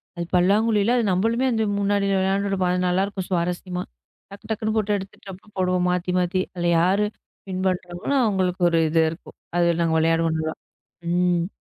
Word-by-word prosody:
அது 170 Hz, -1 st, -4 dB
பல்லாங்குழில, 210 Hz, +4 st, +3 dB
அது 235 Hz, -, +2 dB
நம்மளுமே 230 Hz, +7 st, +1 dB
அந்த 220 Hz, -2 st, +1 dB, 0.2 s
முன்னாடி 200 Hz, 0 st, +1 dB
விளையாண்டிருப்போம். 195 Hz, -1 st, 0 dB
அது 180 Hz, -, 0 dB
நல்லா 180 Hz, +2 st, +2 dB
இருக்கும் 195 Hz, -2 st, -5 dB
சுவாரஸ்யமா. 180 Hz, 0 st, -2 dB, 0.5 s
டக்கு, 200 Hz, -, -12 dB
டக்குன்னு 220 Hz, 0 st, -1 dB
போட்டு 210 Hz, -1 st, +1 dB
எடுத்துட்டு, 195 Hz, 0 st, -10 dB
அப்புறம் 205 Hz, +3 st, -16 dB
போடுவோம் 180 Hz, -1 st, +1 dB
மாத்தி, 180 Hz, 0 st, -1 dB
மாத்தி. 180 Hz, +1 st, 0 dB
அதுல 175 Hz, -1 st, -1 dB
யாரு 195 Hz, +4 st, +2 dB, 0.4 s
வின் 185 Hz, 0 st, -3 dB
பண்றவங்களோ 180 Hz, +6 st, -2 dB
அவங்களுக்கு 185 Hz, -3 st, 0 dB
ஒரு 165 Hz, -1 st, +2 dB
இது 165 Hz, +1 st, +3 dB
இருக்கும், 165 Hz, -, -12 dB, 0.2 s
அது 175 Hz, 0 st, +3 dB
நாங்க 165 Hz, -1 st, +1 dB
விளையாடுவோம் 165 Hz, 0 st, +2 dB
நல்லா. 160 Hz, 0 st, -3 dB, 0.6 s
ம். 175 Hz, -1 st, +1 dB
185 Hz, 165 wpm, -23 LUFS, 175-200 Hz, 0.6 s, பல்லாங்குழில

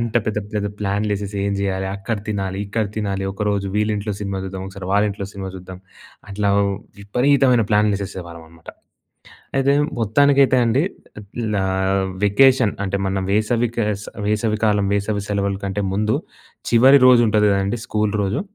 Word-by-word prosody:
అంత 115 Hz, -1 st, -1 dB
పెద్ద 105 Hz, -1 st, -1 dB, 0.2 s
పెద్ద 105 Hz, -1 st, -1 dB
ప్లాన్లేసేసి 100 Hz, 0 st, -2 dB
ఏం 100 Hz, -, 0 dB
చేయాలి? 95 Hz, -1 st, -1 dB
అక్కడ 110 Hz, +3 st, -3 dB
తినాలి, 95 Hz, -2 st, -2 dB
ఇక్కడ 110 Hz, +2 st, -1 dB
తినాలి, 100 Hz, -2 st, -2 dB
ఒకరోజు 100 Hz, -1 st, -1 dB
వీళ్ళింట్లో 105 Hz, 0 st, -1 dB
సినిమా 100 Hz, -1 st, -3 dB
చూద్దాం. 95 Hz, 0 st, -6 dB
ఒకసారి 95 Hz, -1 st, -8 dB
వాళ్ళింట్లో 100 Hz, -1 st, +1 dB
సినిమా 95 Hz, -1 st, -6 dB
చూద్దాం. 90 Hz, 0 st, -10 dB, 0.5 s
అట్లా 100 Hz, +1 st, -1 dB, 0.5 s
విపరీతమైన 125 Hz, +3 st, +3 dB
ప్లాన్‌లేసేసేవాళ్ళం 95 Hz, -5 st, -1 dB
అన్నమాట. 85 Hz, 0 st, -13 dB, 0.9 s
అయితే 135 Hz, +1 st, +3 dB, 0.3 s
మొత్తానికైతే 135 Hz, +4 st, +4 dB
అండి 115 Hz, +4 st, +2 dB, 0.4 s
ఆహ్, 100 Hz, -, -14 dB, 0.3 s
లా 95 Hz, -, +1 dB, 0.6 s
వెకేషన్ 125 Hz, +2 st, +4 dB
అంటే, 100 Hz, +1 st, -1 dB
మన 95 Hz, 0 st, -1 dB
వేసవి 115 Hz, +3 st, +1 dB
క -, -, -5 dB, 0.5 s
వేసవి 105 Hz, 0 st, 0 dB
కాలం, 105 Hz, -2 st, +2 dB
వేసవి 100 Hz, 0 st, -1 dB
సెలవుల 100 Hz, -1 st, -1 dB
కంటే 100 Hz, +1 st, -2 dB
ముందు 105 Hz, +2 st, +1 dB, 0.5 s
చివరి 130 Hz, +4 st, +6 dB
రోజు 125 Hz, -2 st, +7 dB
ఉంటది 105 Hz, -1 st, +3 dB
కదండీ! 100 Hz, +4 st, -1 dB
స్కూల్ 105 Hz, -1 st, 0 dB
రోజు, 100 Hz, +1 st, -1 dB
105 Hz, 140 wpm, -20 LUFS, 100-110 Hz, 0.9 s, రోజు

